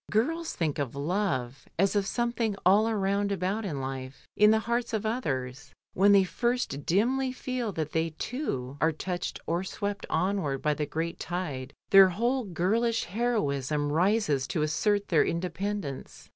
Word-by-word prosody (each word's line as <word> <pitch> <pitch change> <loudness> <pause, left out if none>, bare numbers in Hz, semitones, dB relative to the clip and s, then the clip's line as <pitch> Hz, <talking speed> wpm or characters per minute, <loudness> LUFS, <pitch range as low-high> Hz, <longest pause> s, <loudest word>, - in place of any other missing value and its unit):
Girls 320 +10 0
think 155 -4 -1
of 140 -2 -3
love 140 -5 -2
as 195 +4 +2
of 200 -1 +1
some 240 +1 0
thing 225 -4 -1
all 210 +5 +5
round 200 -1 0
about 195 +3 -1
in 150 -8 -3
life 130 0 -6
in 210 0 +6
the 220 0 +4
hearts 235 0 -1
of 220 0 -1
others; 145 - -3 0.2
when 200 +2 +5
they 200 -1 +7
first 235 - -2
dimly 255 +8 +2
feel 255 -3 -3
that 155 -2 -3
they, 160 0 0
too, 140 - -4
are 160 - +4
touched 175 +3 -4
or 170 +2 -1
swept 200 +1 -4
onward 185 -8 0
by 150 +2 +1
the 150 0 -3
great 165 +1 -3
tide, 145 -7 -4 0.2
their 195 -1 +9
whole 240 +7 0
girl 190 +5 0
ish 230 -1 +1
heroism 150 - -1
rises 165 -5 +2
to 155 - -1
assert 205 +7 +1
their 165 - +5
independence. 180 -2 -4
190 Hz, 165 wpm, -28 LUFS, 150-220 Hz, 0.2 s, their